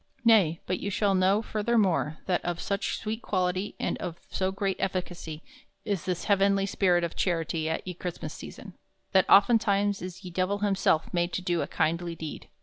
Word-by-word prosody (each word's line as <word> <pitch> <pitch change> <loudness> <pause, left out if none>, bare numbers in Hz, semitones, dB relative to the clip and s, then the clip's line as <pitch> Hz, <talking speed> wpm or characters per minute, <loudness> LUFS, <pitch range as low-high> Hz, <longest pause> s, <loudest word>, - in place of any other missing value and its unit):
Nay, 195 -8 +5
but 185 - -1
you 200 - -3
shall 200 0 +1
know 190 +3 +3
furthermore 205 -9 +1
that 180 -2 0
of 175 -1 -2
soche 200 -1 -2
sweete 220 +1 -4
quality 185 0 -1
and - - -2
of 170 -2 -5
so 190 0 0
great 195 0 -1
efficacy 175 -4 -4 0.4
is 200 -6 -2
this 180 -2 -2
heavenly 195 -1 +3
spirit 180 -3 +2
of 170 - -3
charity 165 -3 -1
at 160 - -3
ye 180 - -3
Chrystmass 175 0 -5
season, - - -10 0.4
that 190 -2 +4
oftentimes 205 -1 +4
is 185 +2 -7
ye 180 - -7
Divell 185 +3 -1
himself 195 -6 +1
made 175 0 +1
to 185 - -2
do 175 -2 0
a - - -2
kindly 170 +2 -1
deed. 160 -2 -7
185 Hz, 180 wpm, -28 LUFS, 175-200 Hz, 0.4 s, Nay